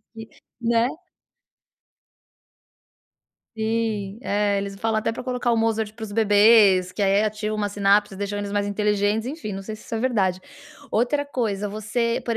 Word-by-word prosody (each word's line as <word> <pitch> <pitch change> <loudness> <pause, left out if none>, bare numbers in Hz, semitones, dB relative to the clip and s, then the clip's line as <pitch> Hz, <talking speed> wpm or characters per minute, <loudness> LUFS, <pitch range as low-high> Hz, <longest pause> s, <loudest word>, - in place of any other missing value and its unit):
aqui, 225 0 -9 0.3
né. 235 +1 +2 2.7
Sim, 220 -2 -2
é, 205 -2 0
eles 200 0 -4
falam 220 +2 -1
até 220 - -1
pra - - -6
colocar 250 -1 -1
o - - +2
Mozart 225 -1 0
para 225 - -12
os 215 - -5
bebês, 205 -3 +5
que 205 - -8
aí 200 +1 +3
ativa 215 0 -2
uma 205 -1 -1
sinapse 205 0 +2
e - - -10
deixam 205 +1 -3
eles 200 0 -5
mais 205 0 0
inteligentes, 210 +2 0
enfim, 275 -9 -6
não 195 0 -5
sei 215 +2 -6
se - - -16
isso - - -6
é 220 - -1
verdade. 195 -8 +1 0.5
Outra 270 +6 +1
coisa, 210 -7 -2
você, 220 +3 -1
por 230 -1 0
215 Hz, 170 wpm, -23 LUFS, 205-225 Hz, 2.7 s, bebês